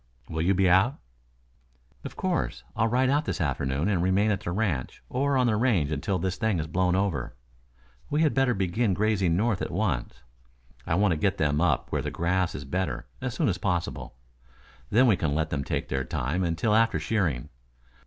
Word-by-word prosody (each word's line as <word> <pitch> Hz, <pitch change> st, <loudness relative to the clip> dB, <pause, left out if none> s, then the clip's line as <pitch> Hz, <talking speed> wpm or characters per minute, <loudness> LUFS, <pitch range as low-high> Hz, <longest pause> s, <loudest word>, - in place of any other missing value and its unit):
"Will 80 Hz, -, -3 dB
you 95 Hz, +4 st, +2 dB
be 95 Hz, 0 st, +3 dB
out?" 95 Hz, +9 st, +4 dB, 1.1 s
"Of -, -, -7 dB
course. -, -, -2 dB
I'll 115 Hz, -, +2 dB
ride 130 Hz, +3 st, +2 dB
out 145 Hz, +2 st, +1 dB
this -, -, -3 dB
afternoon 70 Hz, 0 st, -1 dB
and 95 Hz, -5 st, +1 dB
remain 95 Hz, +4 st, +2 dB
at 100 Hz, -, 0 dB
the 85 Hz, -, -4 dB
ranch 90 Hz, -, -2 dB
or 140 Hz, +1 st, +1 dB
on 130 Hz, -, +3 dB
the 115 Hz, -3 st, +2 dB
range 105 Hz, -, +1 dB
until 85 Hz, +6 st, -1 dB
this 95 Hz, +1 st, -2 dB
thing 110 Hz, -4 st, 0 dB
has 80 Hz, -, -2 dB
blown 90 Hz, +3 st, +1 dB
over. 95 Hz, -13 st, -1 dB, 0.7 s
We 150 Hz, +2 st, +2 dB
had 155 Hz, -, +2 dB
better 135 Hz, -2 st, +2 dB
begin 95 Hz, +2 st, 0 dB
grazing 100 Hz, -5 st, +1 dB
north 105 Hz, -1 st, +1 dB
at -, -, -2 dB
once. -, -, -2 dB, 0.6 s
I 80 Hz, -, +1 dB
want 100 Hz, +1 st, +3 dB
to 80 Hz, -, +1 dB
get 95 Hz, +5 st, 0 dB
them 75 Hz, 0 st, +1 dB
up 80 Hz, -7 st, +1 dB
where -, -, 0 dB
the -, -, -3 dB
grass 90 Hz, +1 st, 0 dB
is 70 Hz, -, -6 dB
better, 80 Hz, -4 st, -2 dB, 0.2 s
as -, -, -3 dB
soon -, -, +1 dB
as -, -, 0 dB
possible. -, -, -2 dB, 0.7 s
Then 125 Hz, +4 st, +4 dB
you 110 Hz, -, +5 dB
can 75 Hz, -4 st, -1 dB
let 80 Hz, 0 st, -1 dB
them 70 Hz, -2 st, -1 dB
take -, -, -3 dB
their 65 Hz, 0 st, -1 dB
time 70 Hz, +8 st, -2 dB
until 85 Hz, +5 st, 0 dB
after 115 Hz, +1 st, +3 dB
shearing. 90 Hz, -, -1 dB
95 Hz, 200 wpm, -27 LUFS, 80-110 Hz, 1.1 s, you